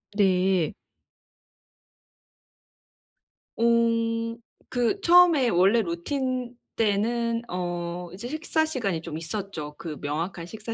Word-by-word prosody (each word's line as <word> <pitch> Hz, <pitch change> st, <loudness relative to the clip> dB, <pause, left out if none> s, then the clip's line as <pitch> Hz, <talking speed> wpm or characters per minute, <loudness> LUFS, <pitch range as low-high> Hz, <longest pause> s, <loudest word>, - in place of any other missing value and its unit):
네. 190 Hz, -4 st, +2 dB, 2.8 s
음. 230 Hz, 0 st, +2 dB, 0.3 s
그 245 Hz, +11 st, 0 dB
처음에 340 Hz, -8 st, +6 dB
원래 195 Hz, +5 st, +4 dB
루틴 250 Hz, +7 st, -3 dB, 0.2 s
때에는 230 Hz, +2 st, +1 dB
어 175 Hz, -1 st, -4 dB
이제 205 Hz, +6 st, -7 dB
식사 315 Hz, +2 st, 0 dB
시간이 220 Hz, -, -2 dB
좀 160 Hz, -2 st, -6 dB
있었죠 165 Hz, -4 st, -5 dB
그 155 Hz, -3 st, -6 dB
명확한 165 Hz, +4 st, -3 dB
식사 220 Hz, +5 st, -7 dB
220 Hz, 175 characters per minute, -26 LUFS, 175-240 Hz, 2.8 s, 처음에